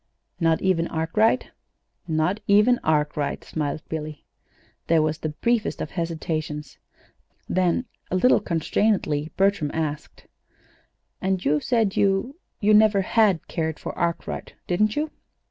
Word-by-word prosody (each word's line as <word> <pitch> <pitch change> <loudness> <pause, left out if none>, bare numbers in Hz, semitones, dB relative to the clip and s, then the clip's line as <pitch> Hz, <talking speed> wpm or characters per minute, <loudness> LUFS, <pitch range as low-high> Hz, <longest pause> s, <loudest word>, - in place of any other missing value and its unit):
"Not 165 -2 +2
even 175 -3 +2
Arkwright?" 190 +10 +1 0.6
"Not 160 +5 0
even 210 +5 +5
Arkwright," 150 -2 0
smiled 150 0 -3
Billy. 155 -1 -6 0.6
There 165 -2 +4
was 155 0 -1
the 155 - -3
briefest 235 -2 +1
of - - -4
hesitations; 155 -4 -4 0.7
then, 185 +6 +1 0.2
a - - -1
little 250 +8 +4
constrainedly, 165 -3 0
Bertram 195 -6 +2
asked: 155 -2 -4 1.0
"And 190 -1 -1
you 150 +2 +3
said 225 - 0
you 200 - +1 0.2
you 210 +1 +3
never 210 -2 +5
had 195 -4 +2
cared 160 -1 -2
for - - -6
Arkwright, 170 -1 -3
didn't 210 +4 +1
you?" 305 +1 -1
170 Hz, 125 wpm, -24 LUFS, 155-210 Hz, 1.0 s, even